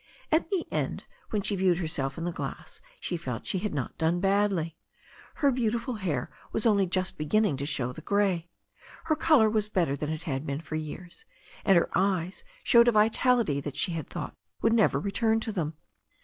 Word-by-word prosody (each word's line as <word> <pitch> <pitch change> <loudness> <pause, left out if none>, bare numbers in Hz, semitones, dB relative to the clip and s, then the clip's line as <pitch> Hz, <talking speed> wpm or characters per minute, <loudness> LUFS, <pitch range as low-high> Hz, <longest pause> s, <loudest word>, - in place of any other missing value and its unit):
At 320 +1 +2
the 380 -4 0
end, - - -2 0.3
when 210 -2 -1
she 205 - -1
viewed 185 -2 +3
herself 155 -6 -1
in 165 - -4
the 175 - -1
glass, - - -6 0.2
she 175 - -3
felt 130 -8 -5
she 190 - 0
had 210 +2 -2
not 140 -4 -4
done 165 +2 +2
badly. 195 -4 +1 0.6
Her 285 -4 +3
beautiful 235 0 -1
hair 160 -11 -2 0.2
was 220 - -1
only 200 -4 +4
just 185 0 -1
be 150 - -2
ginning 215 -3 +3
to 140 +1 -3
show 125 -4 0
the - - -9
grey. 195 -5 +1 0.5
Her 320 -1 +1
colour 300 -9 +5
was 215 -1 +1
better 170 -9 +1
than 150 +1 -4
it 160 +1 -4
had 140 -5 -2
been 140 -1 -3
for 160 - -9
years, 155 +3 -6 0.4
and 195 -3 +5
her 170 - +1
eyes 185 - 0 0.2
showed 235 -1 +6
a - - +7
vitality 220 - +3
that 140 0 -6
she 175 - +1
had 160 -4 -4
thought - - -5 0.2
would 225 - +3
never 225 -3 +3
return 220 +2 +1
to 220 - -2
them. 160 -6 -2
185 Hz, 200 wpm, -28 LUFS, 160-215 Hz, 0.6 s, a